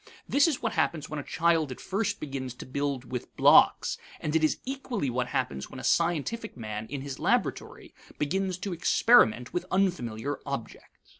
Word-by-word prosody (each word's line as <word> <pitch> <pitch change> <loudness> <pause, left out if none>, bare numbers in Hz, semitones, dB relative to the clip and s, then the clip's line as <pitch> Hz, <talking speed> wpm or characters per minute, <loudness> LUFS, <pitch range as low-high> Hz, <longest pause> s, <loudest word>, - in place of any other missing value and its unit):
This 280 +3 +4
is 300 -7 -2
what 225 -1 0
happens 155 -7 -1
when 155 - -3
a - - -5
child 165 -3 +1
at 130 - -7
first 200 +3 -2
begins 135 -4 -5
to - - -9
build 135 -2 -3
with 125 -2 -5
blocks, - - +5 0.2
and 150 +1 -2
it 160 - +3
is 155 - +2
equally 250 - -3
what 125 0 -1
happens 125 - -2
when - - -9
a - - -8
scientific 175 - 0
man 110 -1 -5
in 140 -1 -5
his 135 -1 -6
laboratory - - -1 0.2
begins 185 +4 -1
to 185 0 -4
experiment 165 - +4
with 175 - -2
unfamiliar 145 - -1
objects. 140 -5 -6
150 Hz, 175 wpm, -28 LUFS, 130-185 Hz, 0.2 s, blocks